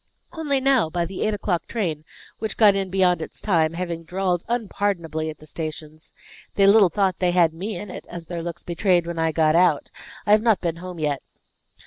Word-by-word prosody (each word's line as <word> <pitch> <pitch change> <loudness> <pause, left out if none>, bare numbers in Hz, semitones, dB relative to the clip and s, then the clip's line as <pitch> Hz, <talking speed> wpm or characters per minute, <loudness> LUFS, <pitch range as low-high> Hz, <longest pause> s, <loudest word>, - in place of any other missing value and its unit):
"Only 300 -5 0
now, 265 -9 +3
by 170 +1 -1
the 185 +2 -6
eight 215 -1 +1
o'clock 185 -4 -2
train, 165 -9 -3 0.3
which 220 -2 -3
got 210 -3 +6
in 195 -1 -1
beyond 180 -3 +2
its - - -7
time, 165 -6 +1
having 170 -1 -4
drawled 180 0 -1
unpardonably 195 -9 -2
at 155 - -8
the 155 - -15
stations. 155 0 -7 0.4
They 200 - +4
little 200 -1 +6
thought 195 0 0
they 180 - +2
had 175 -2 +3
me 195 +6 -5
in 205 +1 -7
it, - - -9
as 170 -1 -7
their 170 0 -5
looks 170 0 -6
betrayed 175 0 +1
when 170 -1 -4
I 160 0 +1
got 155 -1 +2
out. 170 -4 +3 0.3
I 205 - +1
have 210 0 +6
not 225 -3 +3
been 170 -2 -2
home 180 0 -8
yet." 150 -3 -1
175 Hz, 205 wpm, -23 LUFS, 165-200 Hz, 0.4 s, got